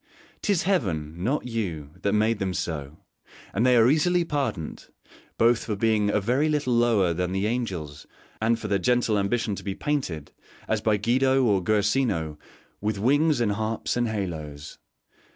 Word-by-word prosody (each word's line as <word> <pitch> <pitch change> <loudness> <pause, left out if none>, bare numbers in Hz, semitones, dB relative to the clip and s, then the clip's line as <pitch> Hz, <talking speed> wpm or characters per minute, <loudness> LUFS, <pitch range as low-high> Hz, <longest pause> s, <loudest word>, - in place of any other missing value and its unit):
'Tis 200 -5 +1
Heaven, 85 - -1
not 135 +7 0
you, 90 -12 -4
that 100 - +1
made 110 +1 +2
them 95 -2 -2
so; 75 -2 -4 0.6
and 110 - +1
they 125 -1 +5
are 115 0 +6
easily 170 +5 +3
pardoned, 140 - -3 0.5
both 115 0 +3
for 105 - -2
being 105 -1 +2
a 105 - +2
very 125 +9 +1
little 145 -4 0
lower 115 -7 +3
than 90 +2 -2
the 95 +1 0
angels 95 -11 -3 0.3
and 115 +1 +2
for 110 - -6
their 100 -1 +1
gentle 120 +2 +2
ambition 110 +2 0
to - - -6
be 100 -2 -3
painted, 90 - -3 0.4
as - - 0
by 110 -1 +2
Guido 130 +5 +2
or 100 -5 +3
Guercino, 105 - +1 0.4
with 105 0 -1
wings 145 +6 +3
and 115 -3 +1
harps 110 +2 -2
and 120 -1 +1
haloes. 80 -9 -5
110 Hz, 165 wpm, -25 LUFS, 95-125 Hz, 0.6 s, are